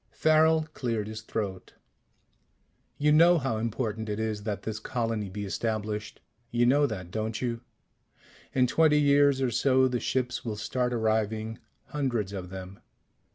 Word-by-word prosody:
Farrel 155 Hz, 0 st, +4 dB
cleared 115 Hz, -5 st, -2 dB
his 110 Hz, 0 st, -6 dB
throat. 100 Hz, -4 st, -5 dB, 1.2 s
"You 150 Hz, +1 st, +3 dB
know 170 Hz, +3 st, +6 dB
how 135 Hz, -7 st, -1 dB
important 110 Hz, -1 st, -3 dB
it 105 Hz, +1 st, -2 dB
is 110 Hz, -2 st, -2 dB
that 100 Hz, -2 st, -3 dB
this 110 Hz, 0 st, -4 dB
colony 115 Hz, -3 st, -2 dB
be 105 Hz, +2 st, -5 dB
established? 105 Hz, 0 st, -3 dB, 0.3 s
You 120 Hz, +1 st, +2 dB
know 145 Hz, +4 st, +4 dB
that, 95 Hz, -7 st, -6 dB
don't 110 Hz, +1 st, -2 dB
you? 120 Hz, -2 st, -2 dB, 0.9 s
In 130 Hz, -1 st, +3 dB
twenty 150 Hz, +3 st, +4 dB
years 140 Hz, -2 st, +4 dB
or 125 Hz, -, +1 dB
so 130 Hz, +2 st, +3 dB
the 125 Hz, -1 st, -1 dB
ships 125 Hz, 0 st, -1 dB
will 110 Hz, -3 st, -3 dB
start 125 Hz, +4 st, -1 dB
arriving. 110 Hz, -1 st, -1 dB, 0.3 s
Hundreds 120 Hz, -9 st, -1 dB
of 90 Hz, -2 st, -6 dB
them. 95 Hz, +1 st, -8 dB
115 Hz, 150 wpm, -28 LUFS, 105-130 Hz, 1.2 s, know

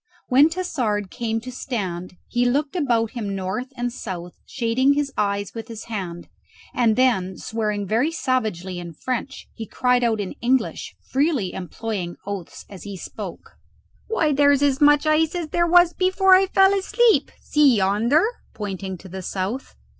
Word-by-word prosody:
When 280 Hz, +4 st, +6 dB
Tassard 245 Hz, -, -2 dB
came 225 Hz, -2 st, -2 dB
to 255 Hz, +2 st, -7 dB
a -, -, -13 dB
stand 185 Hz, -9 st, -4 dB
he 245 Hz, 0 st, 0 dB
looked 280 Hz, +6 st, 0 dB
about 235 Hz, -9 st, +1 dB
him 210 Hz, -6 st, -4 dB
north 195 Hz, +7 st, -3 dB
and 245 Hz, 0 st, -2 dB
south, 180 Hz, -7 st, -6 dB
shading 255 Hz, +3 st, +2 dB
his 285 Hz, -1 st, -1 dB
eyes 200 Hz, -1 st, -1 dB
with 225 Hz, -1 st, -7 dB
his 225 Hz, -2 st, -8 dB
hand, 185 Hz, -6 st, -6 dB, 0.5 s
and 230 Hz, -3 st, +3 dB
then 215 Hz, -8 st, +2 dB
swearing 210 Hz, -2 st, -2 dB
very 230 Hz, -, +1 dB
savagely 215 Hz, -, -2 dB
in 170 Hz, -1 st, -8 dB
French, 255 Hz, -, -4 dB
he 225 Hz, -2 st, -7 dB
cried 250 Hz, -1 st, +1 dB
out 225 Hz, -2 st, +1 dB
in 200 Hz, -2 st, -3 dB
English, 250 Hz, 0 st, 0 dB, 0.2 s
freely 270 Hz, -, +1 dB
employing 190 Hz, -1 st, -4 dB
oaths 200 Hz, -4 st, -6 dB
as 195 Hz, -3 st, -11 dB
he 200 Hz, -2 st, -7 dB
spoke, -, -, -8 dB, 0.6 s
"Why, 320 Hz, -9 st, +1 dB
here's 285 Hz, 0 st, +4 dB
as 280 Hz, -1 st, +2 dB
much 295 Hz, +1 st, +5 dB
ice 310 Hz, +2 st, +2 dB
as 340 Hz, -3 st, -3 dB
there 345 Hz, +2 st, +1 dB
was 350 Hz, 0 st, +5 dB
before 375 Hz, +1 st, +3 dB
I 380 Hz, +1 st, +6 dB
fell 385 Hz, 0 st, +5 dB
asleep! 425 Hz, +4 st, +3 dB
See 290 Hz, -4 st, +4 dB
yonder!" 215 Hz, -, +3 dB, 0.3 s
pointing 195 Hz, -2 st, -5 dB
to 190 Hz, -, -13 dB
the 190 Hz, +1 st, -7 dB
south. 195 Hz, +8 st, -4 dB
235 Hz, 165 wpm, -23 LUFS, 200-285 Hz, 0.6 s, When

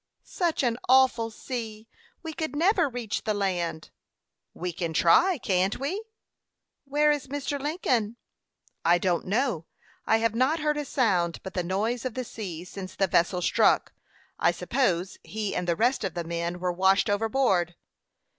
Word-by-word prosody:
"Such 340 Hz, -5 st, -1 dB
an 240 Hz, -1 st, 0 dB
awful 260 Hz, -3 st, +4 dB
sea! 225 Hz, -2 st, -6 dB, 0.4 s
We 320 Hz, -1 st, -5 dB
could 315 Hz, -3 st, -4 dB
never 345 Hz, 0 st, +3 dB
reach 240 Hz, -4 st, -4 dB
the 215 Hz, -1 st, 0 dB
land." 175 Hz, -5 st, -2 dB, 0.6 s
"We 180 Hz, 0 st, -5 dB
can 165 Hz, -1 st, -3 dB
try 340 Hz, -, +5 dB
can't 190 Hz, -3 st, 0 dB
we?" 350 Hz, +11 st, -3 dB, 0.8 s
"Where 295 Hz, +2 st, +3 dB
is 290 Hz, -2 st, -2 dB
Mr. 285 Hz, +1 st, -3 dB
Lincoln?" 255 Hz, -, 0 dB, 0.7 s
"I 175 Hz, +1 st, +5 dB
don't 175 Hz, -1 st, 0 dB
know. 205 Hz, -, 0 dB, 0.4 s
I 220 Hz, -, +5 dB
have 225 Hz, -1 st, +1 dB
not 260 Hz, +7 st, +2 dB
heard 300 Hz, -1 st, 0 dB
a 295 Hz, -, -2 dB
sound 185 Hz, -12 st, +1 dB
but 190 Hz, -, -7 dB
the 180 Hz, -, 0 dB
noise 215 Hz, +7 st, -1 dB
of 255 Hz, -3 st, -4 dB
the 255 Hz, -, -2 dB
sea 185 Hz, -8 st, -6 dB
since 185 Hz, 0 st, -8 dB
the 195 Hz, -, +2 dB
vessel 180 Hz, 0 st, +1 dB
struck. -, -, +3 dB, 0.5 s
I -, -, +4 dB
suppose 190 Hz, -8 st, -1 dB
he 215 Hz, -1 st, -4 dB
and 180 Hz, 0 st, -2 dB
the 170 Hz, -, +2 dB
rest 245 Hz, +7 st, +1 dB
of 190 Hz, -4 st, -3 dB
the 170 Hz, -, -2 dB
men 170 Hz, +1 st, -3 dB
were 180 Hz, 0 st, -1 dB
washed 190 Hz, +2 st, +3 dB
overboard." 205 Hz, -5 st, +1 dB
220 Hz, 165 wpm, -27 LUFS, 180-265 Hz, 0.8 s, try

